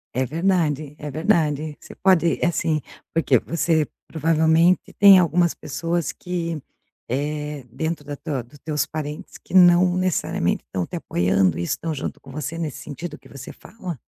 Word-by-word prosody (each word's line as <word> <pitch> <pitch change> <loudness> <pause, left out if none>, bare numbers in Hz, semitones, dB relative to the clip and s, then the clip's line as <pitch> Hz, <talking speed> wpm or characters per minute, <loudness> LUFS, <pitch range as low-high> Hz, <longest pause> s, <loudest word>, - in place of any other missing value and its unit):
É 130 0 +1
verdade, 155 -3 0
é 150 - -5
verdade, 155 -2 0
você - - -13
pode 175 -4 +3
assim, 165 -2 +1 0.3
porque 140 -6 +3
você, 160 0 0 0.2
provavelmente, 160 +2 +2
tem 200 -1 +9
algumas 175 -1 +3
pessoas 165 +3 -2
que, 170 -3 -4 0.5
eh, 150 +2 -3
dentro 160 +4 -3
da 145 0 -5
tua 140 -4 -4
do 120 +5 -19
teus 150 +1 -1
parentes 150 -1 -6
que - - -8
não 180 0 +6
necessariamente 185 -2 0
estão 90 -2 -3
te - - -8
apoiando 90 - +1
e 85 - -2
estão 160 - -2
junto 135 - -5
com 135 - -15
você 155 +3 -5
nesse 155 -4 -3
sentido 150 +2 -7
que - - -19
você 140 -2 -9
fala? 185 -8 -8
155 Hz, 155 wpm, -23 LUFS, 145-170 Hz, 0.5 s, tem